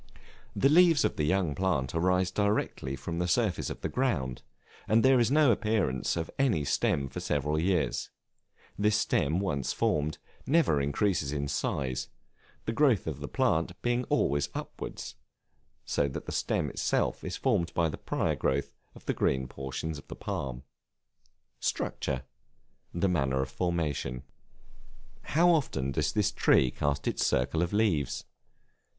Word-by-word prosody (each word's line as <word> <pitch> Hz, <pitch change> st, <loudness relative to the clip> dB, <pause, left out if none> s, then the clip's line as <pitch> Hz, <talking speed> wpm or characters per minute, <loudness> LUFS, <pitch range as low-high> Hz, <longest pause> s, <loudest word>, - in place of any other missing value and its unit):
The 135 Hz, -, +4 dB
leaves 165 Hz, +1 st, +5 dB
of -, -, 0 dB
the 75 Hz, -, 0 dB
young 90 Hz, -2 st, +1 dB
plant 80 Hz, -7 st, 0 dB
arise 90 Hz, +2 st, +2 dB
directly 100 Hz, -9 st, -1 dB
from 85 Hz, +6 st, -5 dB
the 90 Hz, -, 0 dB
surface 100 Hz, 0 st, +1 dB
of -, -, -7 dB
the -, -, -1 dB
ground, 75 Hz, -, -1 dB, 0.5 s
and 115 Hz, +3 st, +4 dB
there 130 Hz, -1 st, +6 dB
is 120 Hz, -, +3 dB
no 145 Hz, -2 st, +5 dB
appearance 105 Hz, -, 0 dB
of 80 Hz, -, -3 dB
any 110 Hz, -, +2 dB
stem 70 Hz, 0 st, +1 dB
for -, -, -6 dB
several 75 Hz, +1 st, 0 dB
years; 90 Hz, -1 st, 0 dB, 0.7 s
this 105 Hz, +1 st, +3 dB
stem 90 Hz, -, +1 dB
once 70 Hz, -9 st, -1 dB
formed, 75 Hz, 0 st, 0 dB, 0.3 s
never 135 Hz, -, +3 dB
increases 75 Hz, 0 st, 0 dB
in 70 Hz, -1 st, -2 dB
size, 65 Hz, -2 st, -2 dB, 0.6 s
the -, -, -1 dB
growth 125 Hz, -6 st, +3 dB
of 80 Hz, -4 st, -4 dB
the -, -, -5 dB
plant 85 Hz, +4 st, 0 dB
being 120 Hz, +1 st, +1 dB
always 70 Hz, +1 st, +1 dB
upward, -, -, -6 dB, 0.8 s
so 70 Hz, -, +1 dB
that 70 Hz, -, -6 dB
the -, -, -5 dB
stem -, -, -1 dB
itself -, -, 0 dB
is -, -, -4 dB
formed 85 Hz, -1 st, +1 dB
by 85 Hz, -1 st, +3 dB
the 80 Hz, -, -4 dB
prior -, -, 0 dB
growth 70 Hz, +1 st, -1 dB, 0.2 s
of -, -, -15 dB
the -, -, 0 dB
green 65 Hz, -1 st, 0 dB
portions 70 Hz, +4 st, -5 dB
of 70 Hz, -, -16 dB
the -, -, -7 dB
palm. 65 Hz, -2 st, -4 dB, 1.0 s
Structure, 65 Hz, -1 st, -2 dB, 0.7 s
the 85 Hz, +3 st, 0 dB
manner 70 Hz, -7 st, +1 dB
of 65 Hz, -, -7 dB
formation. 75 Hz, -5 st, -2 dB, 1.0 s
How 170 Hz, +5 st, +3 dB
often 70 Hz, -, 0 dB
does -, -, 0 dB
this -, -, +1 dB
tree 65 Hz, -2 st, +3 dB
cast 70 Hz, +1 st, -1 dB
its -, -, 0 dB
circle 70 Hz, +6 st, +1 dB
of 85 Hz, -, 0 dB
leaves? 100 Hz, -, +1 dB
80 Hz, 155 wpm, -29 LUFS, 70-105 Hz, 1.0 s, there